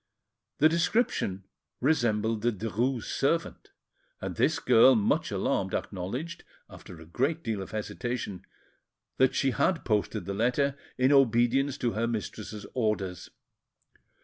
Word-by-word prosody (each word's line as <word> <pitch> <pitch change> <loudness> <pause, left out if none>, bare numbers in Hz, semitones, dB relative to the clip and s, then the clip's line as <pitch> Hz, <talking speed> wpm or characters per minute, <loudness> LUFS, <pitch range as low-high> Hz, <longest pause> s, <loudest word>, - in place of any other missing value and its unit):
The 155 - +6
description 170 - 0 0.4
resembled 115 -6 +1
the 120 +2 +2
Derues' 115 +4 -2
servant; 165 +4 -1 0.5
and - - -5
this - - +2
girl, 125 +3 +6
much 105 -3 +1
alarmed, - - -1
acknowledged, 120 - -5 0.2
after 90 -3 -12
a 80 - -12
great 140 - -1
deal 110 -4 -2
of 95 - -7
hesitation, 110 -3 -4 0.7
that 130 0 +3
she 135 - +2
had 165 +7 0
posted 105 -5 -1
the 100 - -3
letter 125 +6 +1 0.2
in 130 +2 +3
obedience 135 +1 +3
to 120 - 0
her 115 +2 -1
mistress's 110 -1 -5
orders. 105 -6 -2
120 Hz, 125 wpm, -28 LUFS, 105-135 Hz, 0.7 s, The